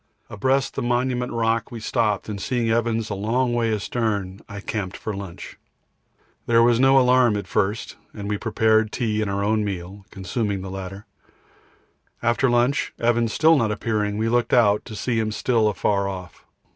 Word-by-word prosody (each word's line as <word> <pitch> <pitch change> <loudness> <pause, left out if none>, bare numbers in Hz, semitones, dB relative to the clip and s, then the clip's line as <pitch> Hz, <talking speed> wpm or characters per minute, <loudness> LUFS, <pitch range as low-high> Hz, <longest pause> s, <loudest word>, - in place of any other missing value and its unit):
Abreast 130 +6 0
the - - -3
Monument 125 +1 0
Rock 115 -1 0
we 120 - -6
stopped, 110 -3 0
and 105 -2 -5
seeing 120 -1 0
Evans 115 -1 0
a - - 0
long 120 +5 0
way 115 -1 +1
astern, 105 -3 -2
I 100 -1 -7
camped 100 -2 -4
for 110 - -5
lunch. 95 -3 -9 0.9
There 115 0 +5
was 120 0 +4
no 135 +1 +5
alarm 125 -4 +4
at 100 - -4
first, 105 +3 -1
and 100 -2 -7
we 105 0 -2
prepared 110 -1 +2
tea 110 -3 -1
and 105 - -1
our 100 0 -1
own 110 +1 +1
meal, 95 0 -5
consuming 100 +1 -3
the 95 - -6
latter. 95 +1 -7 1.2
After 120 +2 +2
lunch, 120 +4 +1
and - - -4
Evans 115 -2 +1
still 160 +1 +5
not 115 -7 +1
appearing, 105 -2 -1
we 110 +1 0
looked 120 +1 +1
out, 105 -4 +4
to 110 - -8
see 115 +2 -1
him 110 -1 -1
still 115 0 +1
afar 100 0 0
off. 90 -3 -9
110 Hz, 180 wpm, -23 LUFS, 100-120 Hz, 1.2 s, There